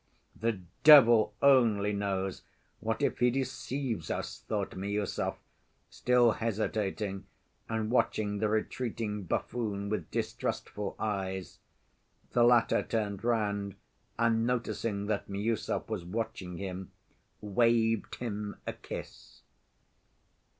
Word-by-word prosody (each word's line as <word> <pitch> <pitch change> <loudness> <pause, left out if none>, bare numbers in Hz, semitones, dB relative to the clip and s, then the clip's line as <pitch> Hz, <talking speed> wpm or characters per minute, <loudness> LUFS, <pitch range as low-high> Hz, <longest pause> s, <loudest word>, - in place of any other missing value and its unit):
"The 115 -3 -1 0.2
devil 120 -8 +8
only 115 -7 +5
knows, 95 -2 -2 0.4
what - - -2
if - - 0
he 125 - +5
deceives 130 - -3
us?" - - -3
thought 100 -3 -1
Miüsov, 100 +1 -2 0.6
still 125 -2 +4
hesitating, 105 -3 -2 0.4
and 110 0 -1
watching 105 -4 +1
the 110 - +1
retreating 110 -2 -2
buffoon 100 +1 -2
with 100 -7 -2
distrustful 105 -1 -3
eyes. 95 -4 -3 0.7
The 120 - +4
latter 120 -1 +5
turned 105 -3 -2
round, 100 -4 0 0.4
and 115 0 +2
noticing 115 -4 -1
that 105 -1 -2
Miüsov 105 +3 -1
was 110 -5 -3
watching 100 -2 -4
him, 95 -1 -6 0.5
waved 115 +1 +2
him 105 -3 -4
a - - -3
kiss. - - -9
105 Hz, 105 wpm, -31 LUFS, 100-115 Hz, 0.7 s, devil